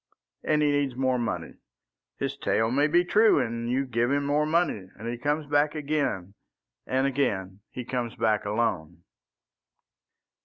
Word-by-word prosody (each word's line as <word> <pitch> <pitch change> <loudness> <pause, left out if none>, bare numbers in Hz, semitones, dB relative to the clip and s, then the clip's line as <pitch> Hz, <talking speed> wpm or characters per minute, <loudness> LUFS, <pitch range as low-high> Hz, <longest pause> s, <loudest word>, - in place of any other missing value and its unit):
And 150 -1 +2
he 145 - +3
needs 140 -3 0
more 130 -1 +1
money. 120 - -4 0.6
His - - -2
tale 110 +1 0
may 145 +4 +3
be 175 +3 +3
true, 215 +4 +5
and 115 0 -2
you 130 +2 +1
give 120 -1 0
him 140 +1 +1
more 150 +2 +1
money; 155 - 0
and 110 +3 -7
he 120 - -2
comes 150 +5 -1
back 145 +1 +1
again, 140 -11 -2 0.5
and 130 +1 +1
again 100 -9 -1
he 125 - -7
comes 125 -2 -3
back 110 -2 +1
alone." 95 -6 -2
130 Hz, 155 wpm, -27 LUFS, 115-145 Hz, 0.6 s, true